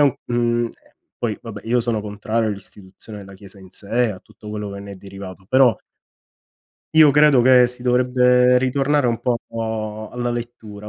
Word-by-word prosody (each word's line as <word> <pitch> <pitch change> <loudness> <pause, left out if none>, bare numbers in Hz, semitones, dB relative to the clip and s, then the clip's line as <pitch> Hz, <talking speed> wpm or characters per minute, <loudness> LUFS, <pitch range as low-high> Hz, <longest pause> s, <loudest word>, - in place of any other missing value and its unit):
un 140 -3 +4
ehm, 120 -1 0 0.5
poi - - -3
vabbè, - - -9
io 120 +2 +1
sono 115 -2 -2
contrario 105 +2 -2
all'istituzione 100 +1 -9
della 100 -1 -12
chiesa 100 +1 -13
in 95 -1 -15
sé, 115 +3 -1
a 95 - -10
tutto 105 - -15
quello 105 -1 -5
che 100 - -8
ne 100 0 -9
è - - -9
derivato, 95 -1 -11
però 130 -3 +4 1.2
io 155 -2 +7
credo 145 -3 +5
che 125 -1 +6
si 125 0 -10
dovrebbe 125 0 +3
ritornare 135 +2 +1
un 115 -1 -1
po' 125 -2 0 0.7
alla 120 0 -3
lettura. 115 -3 -7
120 Hz, 165 wpm, -20 LUFS, 105-125 Hz, 1.2 s, io